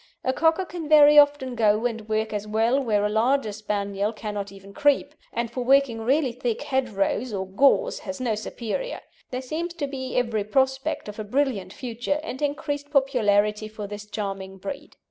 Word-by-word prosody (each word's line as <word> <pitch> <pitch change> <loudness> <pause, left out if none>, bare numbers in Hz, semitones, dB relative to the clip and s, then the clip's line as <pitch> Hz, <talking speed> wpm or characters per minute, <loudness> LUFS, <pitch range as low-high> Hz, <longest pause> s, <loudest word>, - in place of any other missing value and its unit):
A 260 - +1
Cocker 325 +5 +2
can 335 -4 -7
very 295 -1 +8
often 285 -3 +3
go 220 -1 +2
and 225 -2 -3
work 220 0 0
as 210 0 -3
well 225 +5 +2
where 210 -5 +1
a - - +3
larger 225 +2 +1
Spaniel 205 -1 -2
cannot 210 -3 -5
even 195 0 -13
creep, 290 +1 +2 0.2
and 235 0 -2
for 250 +1 -3
working 265 -3 +3
really 265 +3 +2
thick 240 +1 -3
hedgerows 250 -4 -1
or 190 -2 -2
gorse 275 - +3
has 280 -1 -6
no 245 -3 0
superior. 235 - -4 0.3
There 255 +1 -4
seems 335 +6 -4
to 315 -4 -2
be 260 -2 -5
every 230 -4 +1
prospect 265 +4 0
of 210 +1 -8
a - - -2
brilliant 215 -5 -1
future, 245 +5 -3
and 265 -4 -6
increased 290 0 -2
popularity 215 -7 +2
for 215 -1 -7
this 205 +1 -8
charming 195 -2 -5
breed. 280 +9 -7
240 Hz, 180 wpm, -25 LUFS, 210-280 Hz, 0.3 s, very